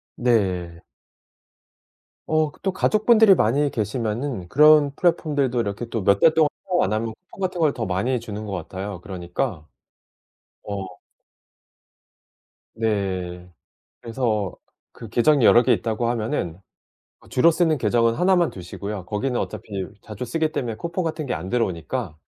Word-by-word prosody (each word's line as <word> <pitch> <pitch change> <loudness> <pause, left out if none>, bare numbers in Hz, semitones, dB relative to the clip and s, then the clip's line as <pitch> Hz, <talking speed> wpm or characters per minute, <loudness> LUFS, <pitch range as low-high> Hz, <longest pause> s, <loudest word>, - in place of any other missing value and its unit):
네. 95 -8 0 1.5
어 155 -1 +1
그 - - -22
또 195 - 0
가족분들이 215 +2 +5
많이 140 +4 +2
계시면은 110 -1 -3
그런 150 +1 +6
플랫폼들도 145 -8 +1
이렇게 105 +1 -2
또 115 -4 -3
몇 100 +1 +4
달 160 - +5
동안 160 -2 +4 0.2
사용 180 -2 +2
안 95 - 0
하면 110 +1 -2
쿠폰 185 - -19
같은 185 -1 -2
걸 150 -3 +3
더 115 - -3
많이 100 +8 0
주는 110 -2 -7
것 105 - -6
같아요. 95 +1 -6
그러니까 85 -4 -4 1.0
어. 100 -2 -4 1.9
네. 95 -5 -2 0.5
그래서 110 -5 -2 0.4
그 115 - -10
계정이 130 +3 +3
여러 120 - +7
개 - - +3
있다고 115 +1 -1
하면은 105 -7 -2 0.6
어 - - -21
주로 165 +7 +4
쓰는 160 -2 +2
계정은 115 0 +2
하나만 180 0 +3
두시고요. 95 +2 -7
거기는 120 +7 -2
어차피 - - -5 0.4
자주 105 +2 -6
쓰기 160 +4 -1
때문에 120 -7 -3
쿠폰 170 - -3
같은 155 -2 -3
게 125 - -2
안 90 +4 -5
들어오니까 95 - -2
115 Hz, 295 characters per minute, -23 LUFS, 100-150 Hz, 1.9 s, 여러